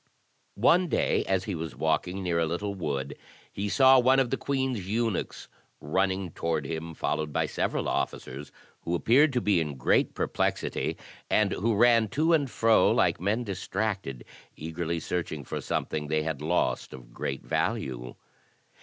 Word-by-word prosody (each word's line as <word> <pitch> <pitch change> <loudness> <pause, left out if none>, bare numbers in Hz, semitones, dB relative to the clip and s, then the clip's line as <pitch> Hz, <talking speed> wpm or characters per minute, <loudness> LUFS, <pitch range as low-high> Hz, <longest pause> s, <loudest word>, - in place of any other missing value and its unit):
One 175 - +4
day, - - +1
as 95 -1 0
he 100 - -4
was 80 -5 -5
walking 80 +6 -1
near 85 -2 0
a 80 - +1
little 100 +5 -2
wood, 70 -7 -3 0.4
he 100 +1 -3
saw 130 +2 +6
one 130 +2 +4
of 130 -3 +1
the - - +2
queen's 130 -8 -2
eunuchs 115 -1 -2 0.3
running 95 +3 -1
toward 80 -2 -2
him, 80 +2 -5
followed 75 -1 -2
by - - +1
several - - -2
officers, 70 +3 -3 0.3
who 85 - -2
appeared 135 - +4
to 125 - +1
be 100 -5 +3
in 75 -4 -4
great - - +2
perplexity, - - -1 0.3
and 105 -3 +3
who 110 +3 0
ran 115 0 +5
to 160 +2 +3
and 145 -4 +2
fro 115 -1 +4
like - - +2
men 105 +6 0
distracted, 95 - -3 0.3
eagerly 80 +1 -3
searching 80 -3 -3
for - - -5
something 75 -1 -2
they 75 +1 0
had 80 -3 -3
lost 85 +3 0
of - - -12
great 70 +2 -4
value. 60 -2 -2
90 Hz, 160 wpm, -28 LUFS, 80-115 Hz, 0.4 s, saw